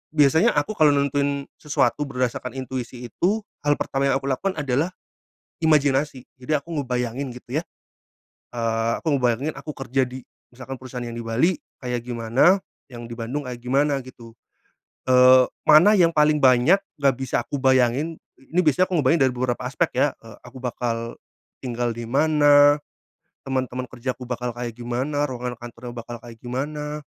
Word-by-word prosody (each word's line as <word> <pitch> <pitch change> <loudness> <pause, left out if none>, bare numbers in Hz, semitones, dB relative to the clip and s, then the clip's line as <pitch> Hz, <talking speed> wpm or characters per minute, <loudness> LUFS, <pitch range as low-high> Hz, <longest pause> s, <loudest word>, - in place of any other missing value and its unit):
biasanya 160 - +5
aku 145 +8 0
kalau 155 -2 +6
nentuin 140 0 0 0.2
sesuatu 150 0 +1
berdasarkan 125 -3 -2
intuisi 125 -1 -5
itu 200 - +1 0.2
hal 145 0 +3
pertama 135 0 0
yang 135 - +2
aku 135 - -6
lakukan 190 +8 -1
adalah 145 +3 0 0.7
imajinasi. 145 -3 +2 0.2
Jadi 130 +4 -6
aku 150 +4 -4
ngebayangin 125 0 -2
gitu 125 +3 -4
ya. - - -7 0.9
Eee, 115 -1 0
aku 160 -3 0
ngebayangin 125 +4 0
aku 150 - -7
kerja 135 0 0
di 130 +1 -8 0.3
misalkan 130 +1 -8
perusahaan 125 -1 -7
yang 115 0 -6
di - - -4
Bali 120 +11 +2 0.3
kayak 125 -1 -3
gimana, 120 - +3 0.3
yang 120 -2 -9
di - - -6
Bandung 125 +5 -4
kayak 125 - -6
gimana 140 +3 +1
gitu. 115 -3 -13 0.8
Eee, 130 0 +7 0.2
mana 175 +8 +7
yang 170 -2 +5
paling 150 0 +4
banyak 130 +8 +5 0.2
nggak 140 -2 +3
bisa 130 -2 -1
aku 140 - -3
bayangin, 130 +4 +2 0.2
ini 160 +7 -1
biasanya 170 +4 +3
aku - - -1
ngebayangin 145 +2 +3
dari 130 - -1
beberapa 125 -1 -2
aspek 150 +6 0
ya, 145 - +4
eee, 115 -2 -13
aku 125 +1 -12
bakal 115 -2 -3 0.5
tinggal 120 -1 -2
di 115 0 -6
mana, 145 0 +5 0.7
teman-teman 130 -1 -2
kerjaku 130 +1 -5
bakal 125 0 -3
kayak 120 -1 -4
gimana, 130 +5 -2
ruangan 125 -1 -5
kantornya 120 0 -9
bakal 120 0 -7
kayak 120 -1 -11
gimana, 150 +4 -4
130 Hz, 160 wpm, -23 LUFS, 120-145 Hz, 0.9 s, Eee